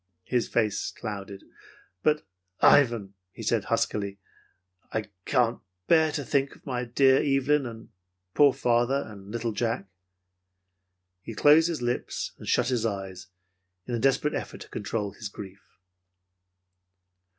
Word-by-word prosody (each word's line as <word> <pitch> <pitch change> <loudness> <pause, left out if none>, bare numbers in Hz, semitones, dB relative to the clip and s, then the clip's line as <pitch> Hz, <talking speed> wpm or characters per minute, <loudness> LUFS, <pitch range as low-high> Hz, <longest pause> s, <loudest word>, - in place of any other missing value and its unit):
His 125 -2 0
face 105 -4 0
clouded. 100 -3 -7 0.6
"But, 150 0 +2 0.3
Ivan," 115 -8 +4 0.2
he - - -9
said - - +1
huskily, 100 -1 -1 0.7
"I 110 -1 -3
can't 120 -3 +2 0.3
bear 160 +2 +4
to 145 -3 -3
think 140 0 0
of - - -22
my 125 -2 -2
dear 130 +3 +4
Evelyn, 140 0 +2
and 115 -1 -10 0.4
poor 145 -1 +6
father, 120 +3 +1
and 100 -2 -11
little 115 +1 -2
Jack." 115 -1 -2 1.3
He 115 - -8
closed 150 +7 +6
his 160 -7 -3
lips 120 0 -2
and - - -10
shut 125 0 +2
his 125 -3 0
eyes 95 -3 -4 0.6
in 125 - -5
a 120 - 0
desperate 135 +4 +2
effort - - -5
to - - -10
control 105 0 -3
his 105 +1 -7
grief. 100 -1 -10
120 Hz, 135 wpm, -27 LUFS, 105-135 Hz, 1.3 s, poor